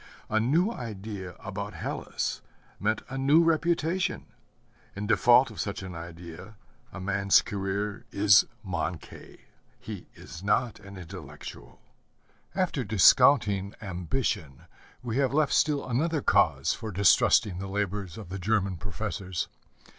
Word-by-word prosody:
A 110 - +3
new 160 - +2
idea 100 - -7
about - - -6
Hellas - - -3 0.4
meant 110 +2 0
a 135 0 -5
new 145 +5 +5
reputation. 165 +2 0 0.7
In 100 +1 -4
default 120 +3 +5
of 110 - -10
such 100 -2 -4
an 95 -1 -7
idea 85 +4 -9 0.4
a 95 - -8
man's 100 +1 +3
career 100 +3 -3
is 100 0 +5 0.2
manquée; 90 -4 -5 0.4
he 105 -5 -8
is 80 +2 -10
not 105 +4 0
an 100 -1 -11
intellectual. 85 -8 -10 0.7
After 175 -8 0
discounting 105 -1 +4
ambition, 90 - -3 0.4
we 120 0 -2
have 140 -1 +1
left 155 -2 +2
still 145 -3 +2
another 150 +5 0
cause - - +3
for 110 - -6
distrusting 95 0 +4
the 95 - -5
labors 100 -2 -3
of 105 -6 -9
the 95 +1 -5
German 100 -1 0
professors. 95 0 -4
105 Hz, 125 wpm, -28 LUFS, 95-125 Hz, 0.7 s, new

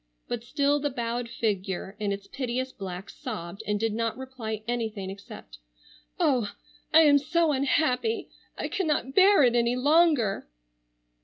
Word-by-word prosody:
But 240 -1 -3
still 285 +2 +1
the 290 0 -1
bowed 240 -2 -3
figure 195 -3 -2
in 205 -1 -1
its 200 0 -4
piteous 255 +3 -3
black 190 -2 -7
sobbed 200 - -7
and 210 0 0
did 225 0 0
not 230 +1 -1
reply 235 -5 -6
anything 220 -5 -3
except, 125 - -11 0.6
"Oh, 255 - +2 0.4
I 320 - +8
am 290 -2 +6
so 320 +3 +1
unhappy! 290 - 0 0.3
I - - -2
cannot 305 - -1
bear 385 -1 +6
it 245 -1 +4
any 235 0 +2
longer." 285 - +3
240 Hz, 145 wpm, -27 LUFS, 210-290 Hz, 0.6 s, I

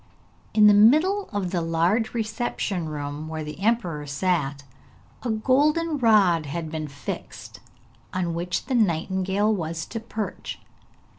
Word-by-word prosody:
In 215 -1 +7
the 210 - +8
middle 310 - +4
of 200 -4 -2
the 175 -3 0
large 170 +8 +1
reception 215 -6 -2
room 145 +1 -5
where 160 0 -4
the 150 +1 -8
emperor 185 -9 0
sat 145 -2 -1 0.6
a 245 - -3
golden 290 +8 +2
rod 195 - +4
had 160 +2 -4
been 155 -1 -4
fixed, 140 -2 -8 0.5
on 175 -2 -1
which 175 +2 -2
the 265 - -3
nightingale 190 0 +1
was 165 -3 -3
to 225 - -5
perch. 220 -1 -5
185 Hz, 135 wpm, -25 LUFS, 160-225 Hz, 0.6 s, the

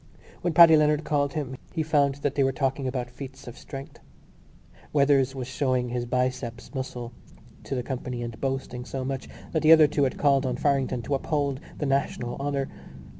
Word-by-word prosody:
When 175 - 0
Paddy 165 0 +9
Leonard 150 0 +3
called 145 -2 0
him 135 -4 -3 0.2
he 160 - 0
found 145 -3 +2
that 145 - +1
they 140 - +2
were 135 - +2
talking 135 0 -1
about 125 -2 -3
feats 135 +1 -10
of 120 - -8
strength. 135 0 -9 0.9
Weathers 140 -2 +3
was 130 -2 -4
showing 130 -2 0
his 120 0 -3
biceps 125 0 -2
muscle 125 -3 -5 0.5
to - - -3
the 125 - -2
company 125 -2 -4
and 115 -1 -7
boasting 135 -2 -3
so 130 +1 -5
much 135 0 -4 0.2
that 160 - 0
the 155 - +6
other 160 -1 +9
two 145 -1 +1
had 130 - -2
called 140 -2 +3
on 125 -2 -1
Farrington 135 -4 0
to 145 - -2
uphold 140 -1 0 0.2
the 150 - -2
national 135 -3 -1
honour. 140 -1 -1
135 Hz, 185 wpm, -26 LUFS, 125-145 Hz, 0.9 s, Paddy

